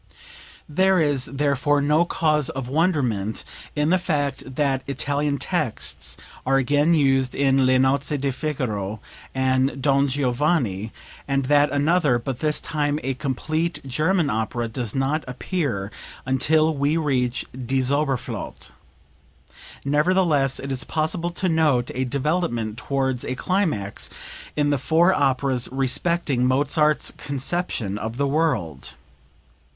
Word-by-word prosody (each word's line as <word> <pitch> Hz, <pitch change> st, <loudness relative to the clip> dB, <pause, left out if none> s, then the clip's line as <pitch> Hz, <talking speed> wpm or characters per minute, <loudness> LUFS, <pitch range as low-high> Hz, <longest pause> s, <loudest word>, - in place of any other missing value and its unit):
There 190 Hz, +4 st, +3 dB
is, 145 Hz, -4 st, +2 dB
therefore, 145 Hz, 0 st, +1 dB
no 150 Hz, +4 st, +3 dB
cause 155 Hz, -4 st, +1 dB
of 130 Hz, -2 st, -4 dB
wonderment 130 Hz, -, 0 dB, 0.3 s
in 150 Hz, +2 st, +1 dB
the 185 Hz, -, +4 dB
fact 145 Hz, -6 st, -2 dB
that 135 Hz, -2 st, +1 dB
Italian 140 Hz, +2 st, -1 dB
texts -, -, -2 dB, 0.3 s
are 135 Hz, +1 st, +2 dB
again 145 Hz, +5 st, +3 dB
used 135 Hz, -3 st, +2 dB
in 135 Hz, -1 st, +3 dB
"Le 130 Hz, 0 st, +4 dB
Nozze 140 Hz, +3 st, +2 dB
di 135 Hz, 0 st, 0 dB
Figaro" 110 Hz, -8 st, -3 dB, 0.4 s
and 130 Hz, +1 st, +1 dB
"Don 140 Hz, +1 st, +3 dB
Giovanni," 125 Hz, -, 0 dB, 0.4 s
and 135 Hz, -1 st, 0 dB
that 145 Hz, +1 st, +4 dB
another, 145 Hz, -2 st, +3 dB
but 120 Hz, +1 st, -4 dB
this 150 Hz, -1 st, 0 dB
time 150 Hz, -2 st, -1 dB
a 135 Hz, -, -1 dB
complete 155 Hz, +6 st, -2 dB
German 155 Hz, +4 st, +1 dB
opera, 110 Hz, +2 st, -1 dB
does 115 Hz, -1 st, -4 dB
not 135 Hz, +4 st, 0 dB
appear 125 Hz, -, -2 dB, 0.3 s
until 155 Hz, +5 st, +2 dB
we 145 Hz, +2 st, +1 dB
reach 125 Hz, -6 st, 0 dB
"Die 130 Hz, +1 st, -1 dB
Zauberflote." 135 Hz, 0 st, -2 dB, 1.1 s
Nevertheless 150 Hz, -2 st, +2 dB
it 135 Hz, -, -5 dB
is 130 Hz, -, -1 dB
possible 165 Hz, +2 st, -1 dB
to 180 Hz, +2 st, -2 dB
note 150 Hz, -7 st, +2 dB
a 130 Hz, +1 st, -1 dB
development 135 Hz, -5 st, -1 dB
towards 130 Hz, +1 st, -1 dB
a 130 Hz, -, -3 dB
climax 155 Hz, -, -1 dB, 0.5 s
in 145 Hz, -1 st, +2 dB
the 145 Hz, -, +1 dB
four 170 Hz, +7 st, +3 dB
operas 135 Hz, -3 st, +1 dB
respecting 135 Hz, 0 st, +1 dB
Mozart's 145 Hz, +3 st, +2 dB
conception 135 Hz, -, -2 dB
of 110 Hz, +2 st, -5 dB
the 140 Hz, -, +1 dB
world. 135 Hz, -, -1 dB
140 Hz, 125 wpm, -23 LUFS, 130-155 Hz, 1.1 s, the